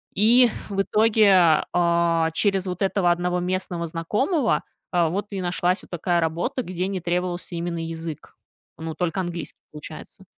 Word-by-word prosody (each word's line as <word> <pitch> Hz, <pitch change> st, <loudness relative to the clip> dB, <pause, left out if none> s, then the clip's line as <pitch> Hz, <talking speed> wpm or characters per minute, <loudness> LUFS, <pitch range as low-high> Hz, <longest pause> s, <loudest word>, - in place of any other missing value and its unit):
И 235 Hz, +4 st, +6 dB, 0.2 s
в 195 Hz, -1 st, 0 dB
итоге, 200 Hz, -7 st, +4 dB
а, 170 Hz, -1 st, +2 dB
через 195 Hz, +1 st, +1 dB
вот 180 Hz, +1 st, -4 dB
этого 190 Hz, -2 st, +2 dB
одного 180 Hz, +1 st, 0 dB
местного 180 Hz, -2 st, -2 dB
знакомого, 225 Hz, -, 0 dB, 0.3 s
а, 170 Hz, -3 st, +2 dB
вот 200 Hz, +4 st, -3 dB
и 195 Hz, -2 st, -3 dB
нашлась 180 Hz, +1 st, 0 dB
вот -, -, -17 dB
такая 175 Hz, 0 st, 0 dB
работа, 170 Hz, -, -1 dB
где 185 Hz, +1 st, -3 dB
не 195 Hz, -2 st, -3 dB
требовался 175 Hz, 0 st, -2 dB
именно 170 Hz, -1 st, -3 dB
язык. 165 Hz, -2 st, -7 dB, 0.4 s
Ну, 160 Hz, 0 st, -5 dB
только 180 Hz, +1 st, -1 dB
английский, 175 Hz, -2 st, -5 dB
получается. 155 Hz, +5 st, -10 dB
175 Hz, 150 wpm, -24 LUFS, 170-195 Hz, 0.4 s, И